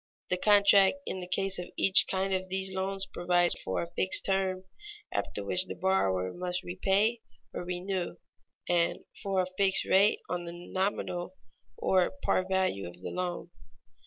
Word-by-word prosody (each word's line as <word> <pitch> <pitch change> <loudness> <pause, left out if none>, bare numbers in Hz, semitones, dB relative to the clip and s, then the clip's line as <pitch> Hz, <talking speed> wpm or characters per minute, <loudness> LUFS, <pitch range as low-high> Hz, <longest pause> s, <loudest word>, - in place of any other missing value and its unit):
The 180 - +2
contract 200 +1 +5
in 190 - -4
the 180 - -7
case 195 +1 -1
of 180 - -5
each 195 - +5
kind 190 0 0
of 185 0 -2
these 190 0 0
loans 195 +1 -2
provides 175 -1 +1
for 95 - -2
a 170 - -9
fixed 185 - +2
term 190 -1 0 0.5
after - - -3
which 185 +1 +1
the - - -6
borrower 95 - 0
must 180 0 -2
repay 195 +6 +1 0.3
or - - -4
renew, 180 0 -3 0.5
and 175 -1 +1 0.2
for 195 -2 0
a 185 - -7
fixed 195 -1 +4
rate 200 +2 +4
on 175 0 -3
the 170 - -7
nominal 180 0 -3 0.4
or 185 +4 +2
par 185 - +2
value 190 - 0
of 85 0 -11
the - - -6
loan. 180 -1 -4
185 Hz, 160 wpm, -29 LUFS, 175-190 Hz, 0.5 s, contract